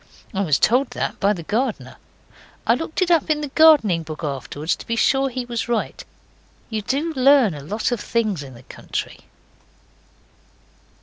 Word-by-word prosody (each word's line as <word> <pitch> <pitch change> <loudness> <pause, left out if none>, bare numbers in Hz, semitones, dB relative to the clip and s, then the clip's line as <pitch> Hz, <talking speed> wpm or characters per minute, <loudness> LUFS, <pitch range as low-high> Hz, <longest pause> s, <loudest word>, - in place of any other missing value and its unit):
I 195 - -1
was 155 -7 +2
told 250 +3 +2
that - - -3
by 200 0 +3
the 180 -5 -4
gardener. 225 +6 -2 0.7
I - - +4
looked 325 +7 -1
it 355 - -1
up 330 -2 +3
in 300 -1 +1
the 295 - -4
gardening 270 - +5
book 155 0 -8
afterwards 145 +2 -3
to - - -12
be 230 - -1
sure 270 +4 +2
he 255 0 -4
was 235 -1 -4
right. 235 -2 -2 0.7
You 220 -1 -2
do 285 +9 -2
learn 265 - +4
a 145 - -8
lot 210 - -2
of 240 - -1
things 215 -9 -1
in 135 -3 -10
the 120 - -14
country.) - - -6
230 Hz, 175 wpm, -21 LUFS, 175-270 Hz, 0.7 s, gardening